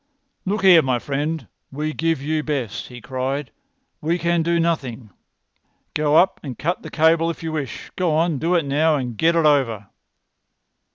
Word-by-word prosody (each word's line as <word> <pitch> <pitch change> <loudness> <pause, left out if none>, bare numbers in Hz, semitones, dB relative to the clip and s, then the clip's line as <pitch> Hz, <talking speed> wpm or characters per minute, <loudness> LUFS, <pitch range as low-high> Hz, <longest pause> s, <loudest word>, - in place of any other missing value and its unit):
"Look 200 +2 -1
here, 180 -4 +8
my 130 -4 0
friend! 145 +1 -3 0.2
We 150 +3 -3
give 165 -3 -1
you 155 +1 0
best!" 135 -9 -3
he 125 -1 -11
cried. 130 +2 -3 0.5
"We 165 +3 0
can 170 0 +1
do 170 +1 +1
nothing. 130 -10 -2 0.8
Go 150 0 +1
up 185 +3 +3
and 130 -5 -7
cut 170 +4 -2
the - - -8
cable 165 +1 +3
if 165 - -6
you 160 - -3
wish. 145 -5 -5
Go 180 -3 0
on—do 165 +1 +1
it 165 -4 +2
now, 150 +3 +2
and 125 -4 -3
get 165 +7 +2
it 165 -2 +3
over!" 115 -9 +2
155 Hz, 170 wpm, -22 LUFS, 135-165 Hz, 0.8 s, here